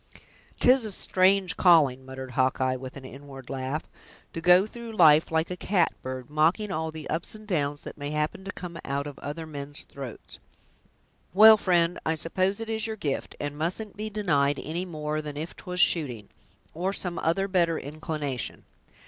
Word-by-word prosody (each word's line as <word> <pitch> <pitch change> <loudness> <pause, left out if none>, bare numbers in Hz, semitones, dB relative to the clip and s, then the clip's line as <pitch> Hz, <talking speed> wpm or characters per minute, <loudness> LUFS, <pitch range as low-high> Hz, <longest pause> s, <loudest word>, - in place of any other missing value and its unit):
"'Tis 255 0 +5
a 215 - -3
strange 185 -1 +3
calling!" 145 -8 +5
muttered 130 0 -8
Hawkeye, 130 +1 +1
with 130 +1 -8
an 135 - -10
inward 135 -1 -10
laugh, 135 +3 -3 0.5
"to 165 - -4
go 180 +3 +6
through 230 +1 -9
life, 160 -6 +6
like 160 +2 0
a - - -2
catbird, 130 -10 -1
mocking 165 +8 +1
all 160 -2 -2
the 155 -1 -8
ups 165 +6 -3
and 215 0 -12
downs 145 -6 -1
that - - -9
may 145 0 -4
happen 150 +5 -2
to 195 - -5
come 175 -3 -8
out 140 +1 -2
of 145 -2 -8
other 155 +3 -5
men's 145 -1 -7
throats. 135 -5 -10 1.0
Well, 220 +2 +10
friend, 175 -4 +1
I 160 - 0
suppose 185 +6 0
it 225 - -5
is 220 0 -2
your 220 - -4
gift, 145 -9 -3
and 145 0 -4
mustn't 185 +7 -3
be 215 +1 -4
denied 145 -10 +1
any 170 +4 -3
more 155 -3 -3
than 150 -1 -7
if 160 +3 -5
'twas 180 -1 -5
shooting, 130 - +1 0.4
or 185 +4 -2
some 180 -3 -2
other 195 +4 +1
better 170 -4 +2
inclination. 145 -3 -5
160 Hz, 175 wpm, -27 LUFS, 145-185 Hz, 1.0 s, Well